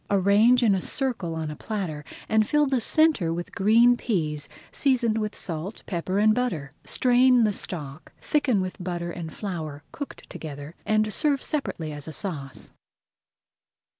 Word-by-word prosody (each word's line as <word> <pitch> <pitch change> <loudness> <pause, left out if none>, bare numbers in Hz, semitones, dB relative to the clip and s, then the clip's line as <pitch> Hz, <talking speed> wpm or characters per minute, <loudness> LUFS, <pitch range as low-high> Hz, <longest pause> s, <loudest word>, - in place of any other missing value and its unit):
Arrange 205 +6 +4
in 215 -4 +5
a 190 - 0
circle 225 -12 -1
on 160 -1 -3
a - - -6
platter, 175 -6 -4 0.2
and 220 -1 +3
fill 295 0 +4
the 265 -3 +1
centre 305 - +3
with 175 +1 -5
green 230 +5 +5
peas 155 -11 -2 0.2
seasoned 240 -5 +2
with 210 -1 -3
salt, 170 +4 -5
pepper, 185 +1 -2
and 215 +1 +5
butter. 180 - -2
Strain 250 -1 +4
the 210 -2 +2
stock, 155 -5 -5
thicken 275 -9 +1
with 185 -1 -5
butter 175 -1 -3
and 165 -2 -6
flour 155 -8 -5
cooked 285 - -8
together, 145 0 -8
and 215 0 +2
serve 285 +2 +1
separately 175 - -2
as 145 0 -6
a 160 - -6
sauce. 145 -9 -5
200 Hz, 155 wpm, -25 LUFS, 165-240 Hz, 0.2 s, in